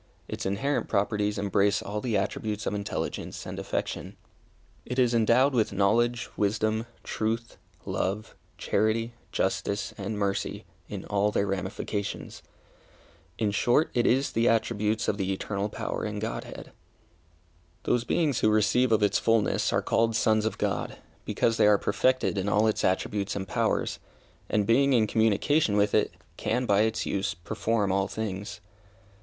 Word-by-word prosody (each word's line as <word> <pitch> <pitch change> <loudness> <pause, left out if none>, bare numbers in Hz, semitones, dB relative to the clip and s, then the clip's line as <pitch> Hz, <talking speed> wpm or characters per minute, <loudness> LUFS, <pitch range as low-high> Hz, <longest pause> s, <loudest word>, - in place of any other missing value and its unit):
Its - - -4
inherent 135 +9 -1
properties 105 +1 0
embrace 100 0 +2
all 105 +1 -4
the 115 -3 0
attributes 105 +1 -2
of - - -1
intelligence 100 -1 -4
and - - -6
affection. - - -4 0.7
It 125 - -5
is 125 -2 +3
endowed 120 +4 +4
with 115 -4 +2
knowledge, 120 +5 +2
wisdom, 110 +2 0 0.2
truth, 115 +2 -3 0.3
love, 105 +4 -2 0.2
charity, 115 +2 0 0.2
justice, 100 0 -1
and 100 +2 -3
mercy, 100 -1 -2 0.2
in - - -6
all 105 +1 +1
their 100 -1 0
ramifications. 95 +1 -4 1.0
In 105 -3 +1
short, 120 +9 +2
it 120 - +2
is 135 +3 +2
the 115 +1 +2
attributes 110 -1 0
of 100 - 0
the 95 -1 -1
eternal 100 +1 -2
power - - -4
and 105 -1 -3
Godhead. 110 +2 -6 1.1
Those 120 - +1
beings 145 -1 +1
who 110 - +3
receive 110 +4 +3
of 110 -1 +3
its 105 - +3
fulness 115 -2 +2
are - - +1
called 115 0 +1
sons 110 -1 +2
of 110 - -4
God, - - -2 0.3
because 115 -1 +1
they - - +5
are 105 -1 +6
perfected 130 -1 +1
in 95 +2 -1
all 105 +2 +3
its 110 - +1
attributes 100 +2 0
and 95 -1 -4
powers, - - 0 0.5
and 105 -1 +1
being 135 +5 +4
in 115 -3 +4
communication 110 +3 +2
with 100 0 +2
it, - - +3 0.3
can, 125 +3 0
by 100 -2 +3
its 110 0 0
use, 95 -4 -1
perform 105 +3 -1
all 95 +1 +1
things. 100 -2 -5
105 Hz, 150 wpm, -27 LUFS, 100-115 Hz, 1.1 s, are